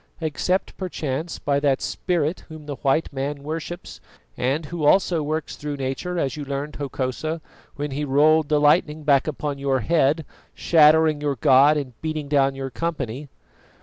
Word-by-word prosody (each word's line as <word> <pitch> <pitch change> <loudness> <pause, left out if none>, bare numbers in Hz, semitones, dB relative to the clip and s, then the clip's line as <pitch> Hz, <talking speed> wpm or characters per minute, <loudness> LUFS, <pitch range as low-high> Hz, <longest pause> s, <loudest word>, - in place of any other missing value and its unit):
"Except, 170 +4 -1
perchance, 160 -4 -4
by 140 -1 0
that 140 -2 +2
Spirit 170 -2 -1
Whom 155 -1 -10
the 145 -2 -6
white 140 +2 0
man 140 +1 -4
worships, 165 +4 -6 0.3
and 135 +6 -1
Who 165 +1 -5
also 170 +1 +3
works 155 +1 -3
through 145 -1 -5
nature, 135 +7 -3
as 140 -5 -1
you 150 - -5
learned, 140 +2 -4
Hokosa, 140 +3 -3 0.4
when 145 0 -4
He 145 +3 -3
rolled 150 +2 +3
the 150 -1 +3
lightning 150 +1 +3
back 140 -1 +3
upon 145 -2 -3
your 135 -2 0
head, 155 +2 +2 0.3
shattering 155 -1 +4
your 145 -2 0
god 135 +5 +5
and 135 -4 -4
beating 155 -2 -3
down 140 -2 +2
your 135 -1 -5
company." 140 -2 -4
150 Hz, 160 wpm, -23 LUFS, 140-160 Hz, 0.4 s, god